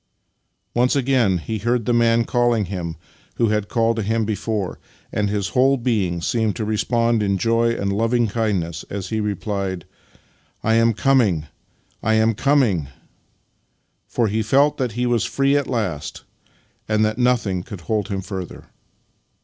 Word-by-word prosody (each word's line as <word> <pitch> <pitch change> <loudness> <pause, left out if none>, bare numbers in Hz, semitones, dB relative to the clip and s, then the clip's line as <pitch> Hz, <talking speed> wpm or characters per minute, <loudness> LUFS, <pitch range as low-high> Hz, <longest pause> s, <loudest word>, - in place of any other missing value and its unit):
" - - -50 0.3
Once 125 +3 +2
again 125 -8 +2
he 110 +5 -4
heard 120 +2 0
the 120 - +1
Man 115 0 +3
calling 120 -3 +1
him 85 -3 -5 0.4
who 115 -2 +2
had 105 -1 -1
called 115 -1 +1
to - - 0
him 110 +2 0
before, 105 -2 -3 0.3
and 105 -1 0
his 100 -1 -1
whole 135 +3 +3
being 105 -9 0
seemed 110 +3 0
to 110 - -3
respond 115 +1 +1
in 100 -1 +1
joy 115 +2 +2
and 100 -3 -2
loving 115 +3 +1
kindness 100 -7 -2
as 95 -2 -5
he 110 - -1
replied: 100 -3 -3 0.4
" - - -38
I 115 - +2
am 115 0 +4
coming, 110 - +2 0.6
I 110 +1 +2
am 110 +1 +3
coming! 115 - +2 0.6
" - - -47
For 115 - 0
he 110 +2 0
felt 140 +7 +3
that 125 -5 -1
he 120 +2 -1
was 120 -2 +1
free 140 +1 +1
at 145 -1 +1
last, 100 - -3 0.7
and 110 0 +3
that 110 +2 -2
nothing 120 -7 +1
could 100 -2 -9
hold 105 +5 -1
him 100 -3 -3
further. 95 -2 -7
110 Hz, 165 wpm, -21 LUFS, 100-120 Hz, 0.7 s, am